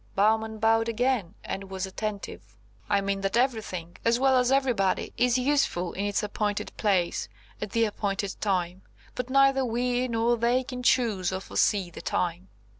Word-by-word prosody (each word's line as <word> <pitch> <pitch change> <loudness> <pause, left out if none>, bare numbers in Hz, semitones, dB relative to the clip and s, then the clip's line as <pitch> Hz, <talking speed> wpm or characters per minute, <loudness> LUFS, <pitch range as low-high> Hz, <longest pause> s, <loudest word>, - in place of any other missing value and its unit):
Bowman 220 +2 +2
bowed 225 +1 +2
again, 230 -5 0
and 195 0 -5
was 190 0 -3
attentive. 205 +1 -6 0.3
"I 200 -1 +3
mean 195 0 -1
that 195 +3 0
everything, 215 -9 -1
as 235 +1 +3
well 265 -1 +4
as 250 +1 +2
everybody, 250 -8 +1
is 245 0 +3
useful 250 -10 +1
in 200 - -2
its 205 +1 0
appointed 205 0 -2
place, 190 -5 0 0.3
at 210 - -3
the 230 +3 +2
appointed 200 -2 -2
time. 185 -2 -1 0.3
But 250 0 -4
neither 275 0 +4
we 245 +1 0
nor 235 0 +1
they 240 +3 +2
can 250 0 -6
choose 220 -8 +2
or 185 - -2
foresee 195 -1 0
the - - -9
time." 175 +1 -2
220 Hz, 165 wpm, -27 LUFS, 195-245 Hz, 0.3 s, well